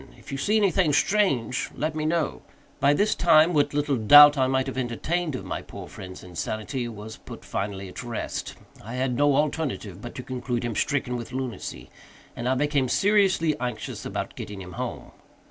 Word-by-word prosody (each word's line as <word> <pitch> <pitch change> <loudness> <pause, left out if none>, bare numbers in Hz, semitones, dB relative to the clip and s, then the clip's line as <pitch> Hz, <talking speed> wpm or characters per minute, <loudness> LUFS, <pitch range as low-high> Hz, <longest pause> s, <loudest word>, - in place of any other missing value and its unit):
If - - -12
you 135 - -3
see 210 +10 +2
anything 190 -6 +3
strange, 140 - +1
let 155 +1 -2
me 155 0 -2
know." 165 -1 -1 0.4
By 145 0 +4
this 205 +6 +2
time 165 0 +5
what 145 -2 +2
little 145 -2 +1
doubt 145 +7 +9
I 130 -2 +2
might 130 0 +1
have 135 - -5
entertained 145 +6 -2
of - - -6
my - - -4
poor - - -10
friend's 95 -1 -10
insanity, 110 - -4
was 110 -1 -8
put - - -11
finally 100 -1 -4
at 90 - -8
rest. 120 -2 -4 0.3
I 115 +5 -7
had 130 -1 0
no 145 +1 +3
alternative 140 - -2
but 120 - -8
to 125 - -6
conclude 125 -1 -3
him 120 - -2
stricken 125 +1 -1
with 120 0 -7
lunacy, 115 - -5 0.4
and 120 +2 -2
I 130 - +2
became 140 -2 +1
seriously 195 - +3
anxious 125 -3 -4
about - - -4
getting 105 -1 -7
him 90 -1 -9
home. - - -6
130 Hz, 185 wpm, -25 LUFS, 115-150 Hz, 0.4 s, doubt